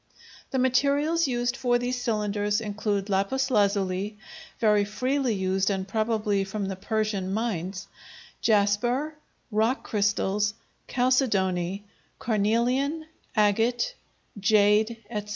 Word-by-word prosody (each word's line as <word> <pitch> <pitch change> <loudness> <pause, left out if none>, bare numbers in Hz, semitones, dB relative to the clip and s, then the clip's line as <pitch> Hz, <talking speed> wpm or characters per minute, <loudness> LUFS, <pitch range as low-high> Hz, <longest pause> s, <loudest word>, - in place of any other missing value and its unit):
The 265 - -2
materials 285 +5 +2
used 245 -1 -1
for 245 -2 +2
these 245 +1 -2
cylinders 210 -2 0
include 205 -2 -2
lapis 210 +7 0
lazuli, 200 -1 +1 0.4
very 210 -2 +3
freely 255 +3 -1
used 190 0 0
and 190 -1 -2
probably 215 -1 0
from 195 +1 -4
the 190 0 -3
Persian 205 -1 -2
mines, 195 -3 -3 0.5
jasper, 240 +8 +2 0.4
rock 220 +5 +1
crystals, 205 0 0 0.3
chalcedony, 200 -7 +1 0.3
carnelian, 245 +8 0 0.3
agate, 225 - +2 0.5
jade, 215 +2 +3
etc. 210 -2 -4
215 Hz, 100 wpm, -26 LUFS, 200-245 Hz, 0.5 s, very